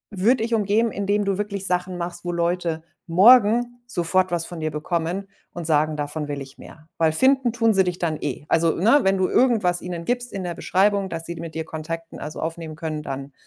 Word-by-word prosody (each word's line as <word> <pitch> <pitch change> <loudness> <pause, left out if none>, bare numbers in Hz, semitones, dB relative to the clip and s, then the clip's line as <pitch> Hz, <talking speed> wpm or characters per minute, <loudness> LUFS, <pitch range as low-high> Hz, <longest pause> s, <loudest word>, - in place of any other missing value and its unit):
würde 225 +5 +2
ich 230 - -2
umgehen, 215 +2 +1
indem 205 +1 0
du 195 -1 0
wirklich 200 -2 -3
Sachen 180 0 -1
machst, 175 0 -5
wo 175 - -1
Leute 170 -1 -1 0.2
morgen 240 +5 +5
sofort 185 -2 +1
was 170 -1 -1
von 175 -2 -7
dir 155 - -1
bekommen 170 +5 -2 0.3
und 175 -1 -5
sagen: 155 0 +2
„Davon 145 +1 -3
will 145 -1 -3
ich 135 0 -11
mehr“, 155 0 -14
weil 160 -1 +3
finden 260 +5 +4
tun 230 -2 +2
sie 190 -1 +4
dich 180 0 -2
dann 160 -3 -1
eh. 145 +1 -4
Also, 165 0 +3
ne, 230 - +4
wenn 195 0 +2
du 185 - +2
irgendwas 215 -9 +2
ihnen 175 -2 -6
gibst 245 0 -1
in 195 -2 -4
der 175 - -3
Beschreibung, 200 0 +1
dass 165 0 -4
sie 170 0 -5
mit 165 -1 -8
dir 160 - -3
Kontakt, 165 +1 -6
ne, - - -9
also, 150 - -6
aufnehmen 160 -1 -5
können, 155 -1 -4
dann, 135 -1 -6
175 Hz, 220 wpm, -23 LUFS, 160-205 Hz, 0.3 s, morgen